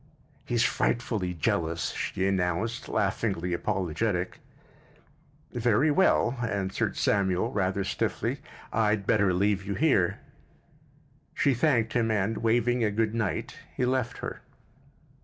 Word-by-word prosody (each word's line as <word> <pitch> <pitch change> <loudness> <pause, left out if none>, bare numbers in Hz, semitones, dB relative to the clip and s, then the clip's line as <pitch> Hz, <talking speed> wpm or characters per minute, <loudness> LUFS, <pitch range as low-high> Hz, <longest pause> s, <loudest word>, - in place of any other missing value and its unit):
"He's 120 -1 +1
frightfully 105 -7 0
jealous," 85 +1 -1
she 95 +1 -2
announced, 95 +4 -1
laughingly 95 -3 -1
apologetic. 90 +2 -1 1.1
"Very 120 +5 +2
well," 135 -7 +3
answered 100 -5 -1
Samuel, 100 +2 +1
rather 100 -3 0
stiffly. 95 - -2 0.3
"I'd 105 -2 +1
better 100 -4 +3
leave 100 +2 +1
you 100 +1 -3
here." 135 - +2 1.2
She 140 - +3
thanked 120 -4 +2
him 115 -2 +1
and, 105 0 0
waving 120 +1 +2
a 105 - +3
good 110 +1 0
night, 110 -5 -2 0.2
he 125 - +1
left 125 -1 -1
her. - - -6
105 Hz, 115 wpm, -28 LUFS, 95-120 Hz, 1.2 s, well